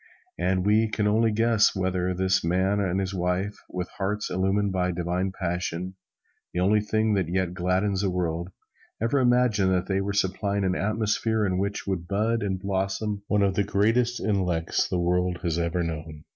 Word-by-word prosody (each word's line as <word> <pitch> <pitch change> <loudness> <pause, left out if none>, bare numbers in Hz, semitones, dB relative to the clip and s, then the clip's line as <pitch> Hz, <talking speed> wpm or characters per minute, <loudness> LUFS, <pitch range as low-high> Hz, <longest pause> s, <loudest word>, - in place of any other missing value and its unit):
And 90 +1 +1
we 110 +2 +4
can 105 -1 -1
only 110 +2 +3
guess 115 -1 +3
whether 95 -1 0
this 95 +1 +1
man 95 +4 +1
and 95 -1 0
his 95 0 -2
wife 90 +3 -1
with 90 -1 -4
hearts 105 +2 -2
illumined 95 +2 +1
by 90 -1 0
divine 90 +2 -1
passion, 90 0 -3 0.6
the - - 0
only 105 +4 +3
thing 110 +1 +1
that 95 -5 +1
yet 90 -1 0
gladdens 95 +2 0
the 100 - +1
world, 85 -1 -2 0.5
ever 115 +5 +1
imagined 120 -6 +3
that 90 0 0
they 95 0 0
were 100 +1 -2
supplying 100 +1 0
an 95 -1 +1
atmosphere 110 +2 0
in 95 -2 0
which 100 +1 -2
would 90 -3 -3
bud 110 +4 0
and 95 -2 -1
blossom 100 +2 -2
one 105 -1 +2
of 100 -1 +2
the 100 - +1
greatest 115 +5 +1
intellects 90 -6 0
the 90 - -1
world 90 0 +1
has 85 -1 0
ever 85 +1 0
known. 80 -2 -6
95 Hz, 180 wpm, -26 LUFS, 90-105 Hz, 0.6 s, we